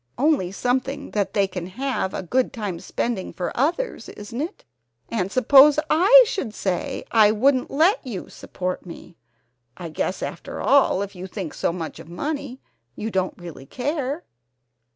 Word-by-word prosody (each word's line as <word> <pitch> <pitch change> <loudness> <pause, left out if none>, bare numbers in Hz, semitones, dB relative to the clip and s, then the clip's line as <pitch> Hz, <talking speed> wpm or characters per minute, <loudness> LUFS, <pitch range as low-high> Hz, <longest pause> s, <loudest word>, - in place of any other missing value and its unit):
Only 275 - +2
something 255 +6 -2
that 205 -2 -1
they 200 -2 +3
can 180 -2 -6
have 250 -2 -2
a - - -3
good 250 +8 +1
time 205 -7 -4
spending 230 0 -3
for 180 - -4
others, 340 - -1
isn't 220 +5 -6
it? 335 +7 -6 0.4
And 195 -4 -1
suppose 275 +4 +7
I 400 +11 +8
should 260 - -4
say 200 +9 -2
I 215 -2 +6
wouldn't 255 +4 +2
let 340 - +3
you 230 -9 -6
support 185 0 -5
me? 170 -1 -11 0.6
I 170 -2 -6
guess 160 +4 -2
after - - -6
all 270 -8 +4
if 200 0 -7
you 180 +1 -7
think 185 -4 -6
so - - 0
much 165 -2 -6
of 165 0 -12
money 280 - -4 0.4
you 220 +1 -4
don't 185 -1 -1
really 165 -6 -10
care!" 285 - -3
225 Hz, 160 wpm, -23 LUFS, 185-280 Hz, 0.6 s, I